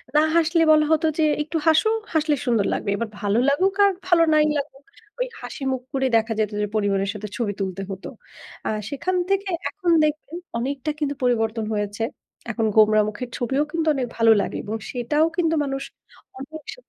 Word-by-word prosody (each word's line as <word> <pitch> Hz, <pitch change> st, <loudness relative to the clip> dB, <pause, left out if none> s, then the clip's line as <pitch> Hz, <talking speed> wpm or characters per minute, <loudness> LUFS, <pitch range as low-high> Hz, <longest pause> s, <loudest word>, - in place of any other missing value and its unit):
না 300 Hz, -, +6 dB
হাসলে 330 Hz, 0 st, +3 dB
বলা 305 Hz, 0 st, +5 dB
হতো 320 Hz, +1 st, +3 dB
যে, 315 Hz, -, +4 dB, 0.2 s
"একটু 310 Hz, +2 st, -3 dB
হাসো, 320 Hz, +7 st, +5 dB, 0.2 s
হাসলে 310 Hz, -1 st, +2 dB
সুন্দর 230 Hz, -5 st, +2 dB
লাগবে।" -, -, -3 dB
এবার 230 Hz, +3 st, -2 dB
ভালো 205 Hz, +2 st, +1 dB
লাগুক 375 Hz, +8 st, +2 dB
আর 400 Hz, -, +4 dB, 0.2 s
ভালো 345 Hz, -2 st, +5 dB
নাই 305 Hz, 0 st, +5 dB
লাগুক, 275 Hz, -1 st, -6 dB, 0.4 s
ঐ -, -, -1 dB, 0.2 s
হাসিমুখ 260 Hz, +1 st, -3 dB
করে 265 Hz, -1 st, +1 dB
দেখা 225 Hz, 0 st, +2 dB
যেত 215 Hz, -2 st, +1 dB
যে 210 Hz, -, 0 dB
পরিবারের 200 Hz, -2 st, +1 dB
সাথে 210 Hz, 0 st, -6 dB
ছবি 220 Hz, -4 st, -1 dB
তুলতে 190 Hz, -1 st, -3 dB
হতো। 190 Hz, 0 st, -7 dB, 0.6 s
আ -, -, 0 dB, 0.2 s
সেখান 335 Hz, +7 st, -2 dB
থেকে 395 Hz, 0 st, 0 dB, 0.2 s
এখন 360 Hz, +2 st, -1 dB
দেখবেন 305 Hz, +2 st, -2 dB, 0.2 s
অনেকটা 275 Hz, +4 st, -2 dB
কিন্তু 285 Hz, -2 st, -1 dB
পরিবর্তন 225 Hz, -2 st, +1 dB
হয়েছে। 205 Hz, +1 st, -2 dB, 0.5 s
এখন 225 Hz, 0 st, -1 dB
গোমড়া 215 Hz, 0 st, +6 dB
মুখের 215 Hz, +4 st, -5 dB
ছবিও 265 Hz, +4 st, 0 dB
কিন্তু 325 Hz, 0 st, -1 dB
অনেক 260 Hz, -2 st, -1 dB
ভালো 230 Hz, -1 st, +5 dB
লাগে -, -, -3 dB
এবং 215 Hz, -, -4 dB, 0.2 s
সেটাও 280 Hz, +6 st, +1 dB
কিন্তু 325 Hz, -2 st, +2 dB
মানুষ 270 Hz, -1 st, -3 dB, 0.6 s
অনেক 315 Hz, +4 st, -8 dB
স -, -, -12 dB
270 Hz, 180 wpm, -23 LUFS, 220-315 Hz, 0.6 s, না